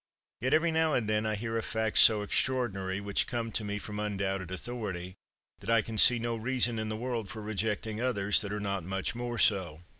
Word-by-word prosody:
Yet, 130 Hz, +5 st, +2 dB
every 165 Hz, +1 st, +2 dB
now 160 Hz, -1 st, +1 dB
and 115 Hz, -4 st, -1 dB
then, 110 Hz, 0 st, 0 dB
I 110 Hz, -, -1 dB
hear 115 Hz, +2 st, -3 dB
of -, -, -5 dB
facts 110 Hz, -1 st, 0 dB
so 105 Hz, -2 st, +7 dB
extraordinary, 100 Hz, -5 st, -1 dB
which 100 Hz, 0 st, 0 dB
come 115 Hz, -2 st, -3 dB
to 110 Hz, -, -1 dB
me 105 Hz, 0 st, -3 dB
from 105 Hz, 0 st, -7 dB
undoubted 95 Hz, -3 st, -3 dB
authority, 95 Hz, -3 st, -5 dB, 0.5 s
that -, -, -9 dB
I 115 Hz, -2 st, +3 dB
can 110 Hz, -2 st, -3 dB
see 125 Hz, -, +8 dB
no 115 Hz, 0 st, -2 dB
reason 120 Hz, 0 st, 0 dB
in 110 Hz, 0 st, -3 dB
the 110 Hz, -, -4 dB
world 115 Hz, -3 st, -4 dB
for 110 Hz, -3 st, -8 dB
rejecting 110 Hz, +1 st, -2 dB
others 105 Hz, -5 st, +2 dB
that 100 Hz, -, -5 dB
are 105 Hz, -, -3 dB
not 100 Hz, -3 st, -3 dB
much 95 Hz, +4 st, -3 dB
more 120 Hz, 0 st, -5 dB
so. 95 Hz, -7 st, +3 dB
110 Hz, 215 wpm, -29 LUFS, 100-120 Hz, 0.5 s, see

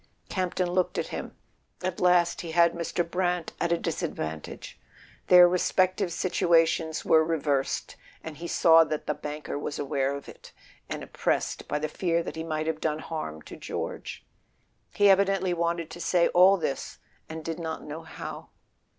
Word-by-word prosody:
Campton 180 Hz, -1 st, -1 dB
looked 180 Hz, 0 st, 0 dB
at -, -, -2 dB
him. -, -, -6 dB, 0.5 s
At 185 Hz, -1 st, -2 dB
last 180 Hz, -1 st, +3 dB
he 165 Hz, -2 st, -6 dB
had 170 Hz, 0 st, +5 dB
Mr. 170 Hz, 0 st, -2 dB
Brant 175 Hz, -1 st, -1 dB
at 170 Hz, -, +1 dB
a 170 Hz, -, +3 dB
disadvantage. 150 Hz, -, -5 dB, 0.5 s
Their 180 Hz, -1 st, +9 dB
respective 185 Hz, +1 st, +1 dB
situations 165 Hz, -3 st, +1 dB
were 160 Hz, 0 st, +5 dB
reversed, 145 Hz, -4 st, -1 dB, 0.3 s
and 160 Hz, -2 st, -8 dB
he 170 Hz, -, -6 dB
saw 165 Hz, -1 st, +6 dB
that 155 Hz, -1 st, -4 dB
the 150 Hz, -, 0 dB
banker 150 Hz, -1 st, -5 dB
was 145 Hz, -, -4 dB
aware 140 Hz, -1 st, -1 dB
of 140 Hz, -, -9 dB
it, -, -, -13 dB, 0.4 s
and -, -, -4 dB
oppressed -, -, -2 dB
by -, -, -1 dB
the 155 Hz, +1 st, -2 dB
fear 170 Hz, +1 st, 0 dB
that -, -, -6 dB
he 160 Hz, -, -4 dB
might 155 Hz, -1 st, -2 dB
have 160 Hz, -1 st, -2 dB
done 155 Hz, -1 st, 0 dB
harm 155 Hz, -, -6 dB
to -, -, -10 dB
George. -, -, -6 dB, 0.7 s
He 205 Hz, -, +5 dB
evidently 195 Hz, -1 st, +3 dB
wanted 170 Hz, -1 st, -1 dB
to 175 Hz, -, -8 dB
say 175 Hz, -1 st, +3 dB
all 185 Hz, +2 st, +6 dB
this 140 Hz, -6 st, -4 dB, 0.3 s
and 160 Hz, 0 st, -7 dB
did 165 Hz, +1 st, -4 dB
not 160 Hz, -1 st, -4 dB
know 150 Hz, +2 st, -7 dB
how. 160 Hz, -, -8 dB
165 Hz, 165 wpm, -27 LUFS, 155-180 Hz, 0.7 s, Their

